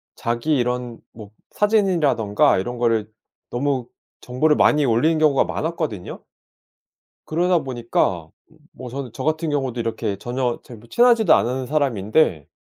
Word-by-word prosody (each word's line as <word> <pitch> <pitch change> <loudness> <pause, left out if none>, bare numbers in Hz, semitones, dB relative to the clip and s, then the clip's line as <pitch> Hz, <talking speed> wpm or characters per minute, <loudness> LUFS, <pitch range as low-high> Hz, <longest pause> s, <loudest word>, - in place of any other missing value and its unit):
자기 120 +6 -1
이런 125 -1 -2
뭐 110 -2 -12 0.2
사진이라든가 170 - +2
이런 120 +6 -4
거를 115 -3 0 0.4
너무 130 -1 -1 0.3
정보를 150 +5 +1
많이 150 -1 +3
올리는 130 +7 +2
경우가 150 -3 +3
많았거든요? 155 - -4 1.0
그러다 175 +2 +2
보니까 115 - -1 0.4
뭐 125 - -9
저는 130 -1 -6
저 130 - -6
같은 155 +1 -1
경우도 135 -4 -2
이렇게 115 -3 -2
전혀 120 +3 -2
잘 120 - -12
뭐 115 +2 -17
친하지도 235 - +4
않은 130 +2 -1
사람인데 120 - +1
125 Hz, 310 characters per minute, -21 LUFS, 115-155 Hz, 1.0 s, 친하지도